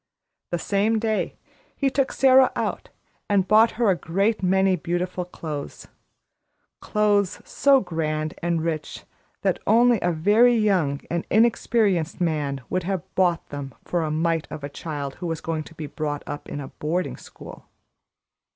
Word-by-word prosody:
The 175 - -1
same 205 +5 +1
day, 220 -1 -1 0.4
he 275 -2 0
took 275 0 +1
Sara 265 -1 +5
out - - -3 0.4
and 195 -2 +2
bought 220 +2 +5
her 235 -4 +3
a - - +2
great 195 +7 0
many 190 0 +3
beautiful 175 +2 -3
clothes 155 -5 -7 0.9
clothes 205 -2 +1
so 275 -2 +4
grand 155 -3 -2
and 170 -2 0
rich 160 -2 -4 0.4
that - - +1
only 240 0 +5
a 175 - +1
very 210 +9 +4
young 185 -11 +1
and 170 0 -2
inexperienced 215 -6 +2
man 150 -5 -1
would 185 - -1
have 185 -1 -2
bought 175 -3 +1
them 140 -3 -7
for 175 - -1
a 155 - -1
mite 165 +1 0
of 150 - -8
a 140 - -4
child 145 -2 -6
who 175 - -2
was 165 -1 -3
to 160 -1 -4
be 155 - -5
brought 145 0 -4
up 145 0 -7
in 145 - -5
a 135 - -7
boarding 170 +4 -2
school. - - -12
175 Hz, 155 wpm, -24 LUFS, 155-210 Hz, 0.9 s, Sara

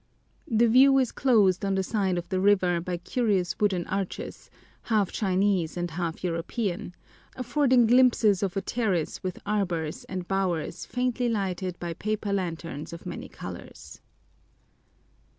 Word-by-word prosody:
The 230 +1 +3
view 270 +4 +6
is 260 -3 +2
closed 205 -9 +3
on 195 -1 +1
the 190 - +1
side 190 -3 0
of 175 - -4
the 190 -2 0
river 185 -3 +3
by 180 0 -3
curious 190 -1 -1
wooden 190 -4 +1
arches, 195 -1 -5 0.3
half 215 -4 +1
Chinese 190 -4 0
and 175 -1 -2
half 170 0 -4
European, 180 +2 -3 0.4
affording 255 -1 +3
glimpses 230 -5 +4
of 195 -1 -1
a - - +1
terrace 195 -7 -1
with 185 -2 -4
arbors 180 -7 -2
and 185 -2 -5
bowers 190 -4 -2
faintly 250 -1 0
lighted 190 -4 -2
by 170 -1 -4
paper 215 +2 -2
lanterns 165 -5 -4
of 170 - -9
many - - -6
colors. - - -10
195 Hz, 140 wpm, -27 LUFS, 175-220 Hz, 0.4 s, view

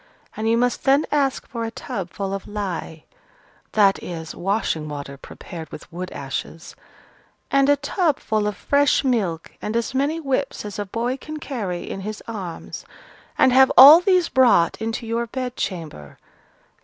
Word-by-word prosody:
And 220 +1 -1
you 230 - +3
must 245 +1 0
then 275 +2 +4
ask 280 -3 0
for 230 -1 -5
a 225 - -2
tub 195 -5 -6
full 195 +1 -4
of 195 - -5
lye," 180 -6 -5 0.7
(that 200 -2 +4
is, 160 -2 -6
washing 175 -5 -2
water 140 -1 -6
prepared 160 +3 -10
with 160 - -11
wood 180 +1 -5
ashes) 140 +4 -6 0.8
"and 275 0 +3
a 285 - +6
tub 290 +2 0
full 215 -2 -1
of 210 -1 -3
fresh 285 0 +2
milk, 200 -11 -1
and 215 +2 -2
as 235 +1 -2
many 285 +5 0
whips 270 -5 -2
as 205 0 -6
a 205 - -3
boy 235 +6 -2
can 310 +2 -8
carry 205 -12 -4
in 195 - -5
his 215 +2 -6
arms, 190 -7 -7 0.5
and 255 - +4
have 265 +1 +6
all 290 +5 +11
these 365 -2 +3
brought 235 -10 +3
into 225 +1 -3
your 230 +1 -2
bed 250 +1 -4
chamber. 155 - -6
220 Hz, 165 wpm, -22 LUFS, 180-265 Hz, 0.8 s, all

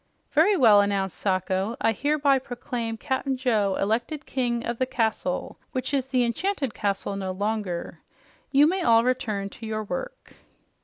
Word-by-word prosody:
"Very 365 +7 +4
well," 220 -8 +7
announced 195 -2 -1
Sacho. 190 +3 0
"I 225 - +3
hereby 285 +2 +2
proclaim 240 -2 -4
Cap'n 265 +1 -2
Joe 220 -7 +1
elected 240 +9 -1
King 240 -2 -1
of 235 0 -3
the 255 - +1
Castle, 220 -7 -2
which 260 +2 -3
is 265 -2 +1
the 255 -2 +2
Enchanted 275 - -1
Castle 200 0 -2
no 195 -1 -3
longer. 200 -2 -3 0.5
You 285 +1 +6
may 370 +4 +1
all 230 -5 +5
return 215 -6 -1
to 230 - -10
your 215 0 -2
work." - - -6
235 Hz, 155 wpm, -25 LUFS, 205-270 Hz, 0.5 s, well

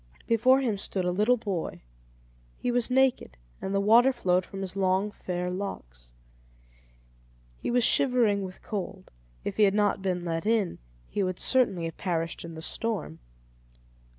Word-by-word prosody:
Before 255 +4 +4
him 225 -6 -1
stood 190 -2 -2
a 180 - +1
little 210 +7 +3
boy; 180 - -4 0.7
he 245 - -1
was 245 0 +1
naked, 255 - +2 0.2
and 190 - -3
the 195 - +1
water 230 +6 +6
flowed 185 -7 0
from 195 - -7
his 190 -1 -5
long 190 +1 +1
fair 180 -2 -4
locks. - - -7 1.5
He - - -3
was 245 0 +2
shivering 235 -6 +3
with 185 -1 -8
cold; 195 -2 -6 0.3
if - - -4
he - - +2
had 200 -1 +4
not 205 -1 +2
been 180 -2 -1
let 165 +3 -2
in, 220 -5 +1 0.3
he - - -2
would 185 -1 -1
certainly 200 -10 +2
have 165 - -6
perished 165 -3 -2
in 165 -1 -8
the 160 - -7
storm. 210 - -3
195 Hz, 160 wpm, -27 LUFS, 180-230 Hz, 1.5 s, water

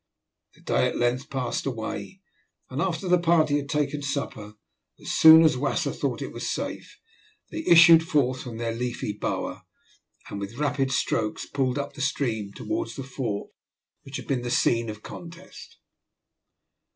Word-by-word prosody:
The - - -22
day - - +1
at - - -3
length 120 +2 0
passed 130 0 -2
away, 125 - -5 0.5
and 135 +4 -2
after 175 0 -2
the 180 0 +4
party 160 -4 +3
had 140 -1 -5
taken 150 -1 0
a - - -8
supper, 125 -7 -4 0.4
as - - -6
soon 160 0 +9
as 155 -4 +4
Wasser 140 +2 0
thought - - -2
it - - -7
was - - -4
safe, - - -5 0.5
they 320 - -4
issued 165 -1 +8
forth 140 -5 0
from 120 -3 -7
their 115 0 -2
leafy 120 -3 -3
bower, 105 - -3 0.7
and 100 - -6
with 100 +4 -7
rapid 140 -2 0
strokes 110 -4 -1
pulled 135 -2 -1
up 140 0 -4
the 145 - -8
stream 115 -7 -1
towards 335 - -4
the 135 - -5
fort 125 -6 -4 0.5
which 135 0 -7
had - - -8
been 130 -3 -1
the 120 - -4
scene 115 -1 +2
of 105 0 -8
contest. 170 +2 -11
135 Hz, 165 wpm, -26 LUFS, 120-155 Hz, 0.7 s, soon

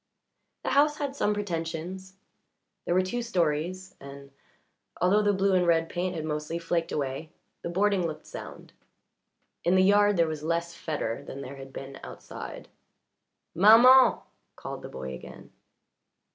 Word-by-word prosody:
The - - -1
house 295 +2 +3
had 280 -2 -3
some 210 -6 +1
pretensions; 185 0 -5 0.7
there 175 - 0
were 185 - +4
two 240 +6 -3
stories, 180 -3 -1
and, 140 0 -11 0.7
although 195 +4 +4
the 205 -1 +3
blue 195 0 +1
and 180 -1 +3
red 165 -1 +2
paint 180 +1 -2
had 155 -1 -4
mostly 150 +1 -3
flaked 170 0 -2
away, 140 +2 -3 0.3
the - - -4
boarding 190 0 +1
looked 155 - -7
sound. - - -10 0.9
In 175 +2 +3
the 185 - +5
yard 205 0 +4
there 170 - +4
was 155 -1 -4
less 170 +2 -2
fetor 145 -10 -4
than 140 - -8
there 140 +1 -8
had 135 0 -10
been 135 0 -8
outside. - - -9 0.9
"Maman!" 235 +7 +7 0.4
called - - -7
the - - -8
boy 65 0 -6
again. 65 - -11
170 Hz, 150 wpm, -27 LUFS, 155-200 Hz, 0.9 s, Maman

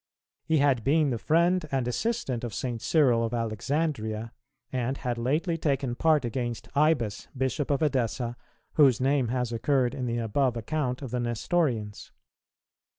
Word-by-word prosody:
He 160 - +2
had 140 -5 +3
been 150 +1 +3
the 120 - -2
friend 170 +6 +2
and 130 -3 0
assistant 130 - -1
of 115 -4 -4
St. 120 -3 -3
Cyril 130 -8 +3
of 115 +1 -1
Alexandria, 115 -1 -2 0.4
and 130 +1 -1
had 120 -2 -3
lately 155 +7 0
taken 140 -5 0
part 155 +1 +2
against 120 0 -3
Ibas, 140 -8 +1
Bishop 130 +2 -1
of 140 +1 +1
Edessa, 125 -4 0 0.4
whose 135 -6 +5
name 135 -1 +2
has 125 0 -1
occurred 125 +1 +1
in 130 -3 -3
the 120 0 -1
above 120 +2 0
account 130 +2 -2
of 130 - -6
the 125 - -1
Nestorians. 120 -2 -1
130 Hz, 155 wpm, -27 LUFS, 120-145 Hz, 0.4 s, whose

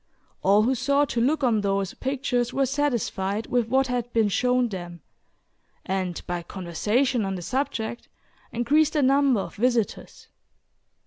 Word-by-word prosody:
All 200 +2 +4
who 250 +4 +2
sought 280 +3 +1
to 235 - -1
look 290 +4 +1
on 225 -4 +2
those 195 -2 -1
pictures 255 -2 -1
were 270 +1 +1
satisfied 235 -7 -1
with 245 -2 0
what 265 +3 +2
had 245 -2 -3
been 225 -2 +3
shown 250 +4 +2
them, 175 -5 -7 0.8
and, 185 -2 -2
by 175 -1 -3
conversation 210 +8 -1
on 195 -1 -2
the 180 - -6
subject, 235 -1 -3 0.4
increased 295 +6 +2
the 300 -3 +2
number 270 -4 +3
of - - -8
visitors. 235 -1 -1
240 Hz, 145 wpm, -25 LUFS, 200-265 Hz, 0.8 s, All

